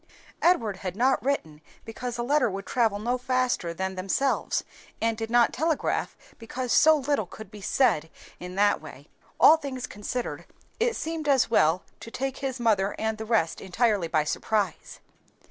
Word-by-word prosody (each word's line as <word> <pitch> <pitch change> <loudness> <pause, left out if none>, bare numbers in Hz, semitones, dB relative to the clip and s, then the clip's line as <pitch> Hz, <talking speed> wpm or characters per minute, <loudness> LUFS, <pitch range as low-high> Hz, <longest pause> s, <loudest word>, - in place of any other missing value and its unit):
Edward 230 - +2
had 185 -1 -5
not 255 +1 +2
written 160 - -2 0.2
because 235 +2 -5
a 240 - -2
letter 285 0 +2
would 195 0 -6
travel 225 -5 +1
no 240 +4 -1
faster 250 -8 0
than 190 +3 -3
themselves, 195 +9 0 0.4
and 225 0 +1
did 225 0 -5
not 240 0 +4
telegraph 320 +1 -1 0.2
because 245 +2 -3
so 315 0 +6
little 280 -7 -1
could 220 +1 -11
be 210 -2 -11
said 160 - +2 0.3
in 180 +1 -8
that 205 +1 +3
way. - - -12 0.3
All 320 - +8
things 265 -5 -5
considered, 240 +3 -5 0.3
it 470 0 +1
seemed 320 -1 -4
as 265 -4 +3
well 165 -4 +3 0.2
to - - -9
take 265 +3 -3
his 265 -2 -4
mother 205 -4 +1
and 220 0 -2
the 220 - -4
rest 215 -8 0
entirely 205 -2 +1
by 155 -2 +1
surprise. 200 +3 -2
230 Hz, 165 wpm, -26 LUFS, 195-260 Hz, 0.4 s, All